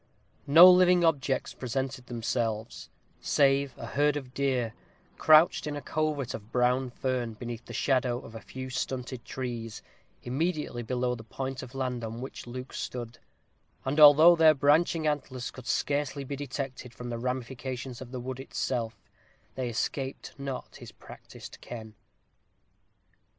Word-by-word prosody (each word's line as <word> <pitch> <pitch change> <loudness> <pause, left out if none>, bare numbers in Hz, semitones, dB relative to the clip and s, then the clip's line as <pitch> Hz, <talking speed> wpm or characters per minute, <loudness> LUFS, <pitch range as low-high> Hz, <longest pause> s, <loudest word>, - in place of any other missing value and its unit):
No 165 +6 +10
living 180 -1 +6
objects 140 -5 +1
presented 130 0 -4
themselves, 115 -2 -3 0.3
save 140 -1 +2
a - - -7
herd 145 +4 +1
of 130 -3 -8
deer, 130 -5 0 0.5
crouched 155 0 +5
in 150 - -3
a 145 - -5
covert 150 -4 -1
of 110 +1 -9
brown 125 +1 +2
fern 125 -2 -2
beneath 120 +1 -7
the - - -10
shadow 125 0 +1
of 115 - -12
a 115 - -8
few 130 0 -8
stunted 130 -2 -4
trees, 120 -4 -5 0.4
immediately 150 -1 -2
below 125 +1 -1
the 115 -2 -7
point 130 +3 -5
of 130 +1 -10
land 125 -3 -2
on 115 +1 -5
which 130 -1 -8
Luke 125 +2 -7
stood; 120 -1 -5 0.7
and 140 +3 0
although 155 +3 +9
their 160 -2 +6
branching 155 +3 +3
antlers 135 -4 -2
could 130 -1 -11
scarcely 145 -1 -1
be 140 +1 -5
detected 135 -3 -6
from 125 0 -7
the 115 - -3
ramifications 125 0 -4
of 130 - -8
the 130 0 -5
wood 130 +1 -5
itself, 120 -3 -3 0.6
they 130 -2 -3
escaped 130 +3 -3
not 140 -2 -6
his - - -11
practised - - -12
ken. 110 -2 -8
130 Hz, 145 wpm, -29 LUFS, 120-140 Hz, 0.7 s, No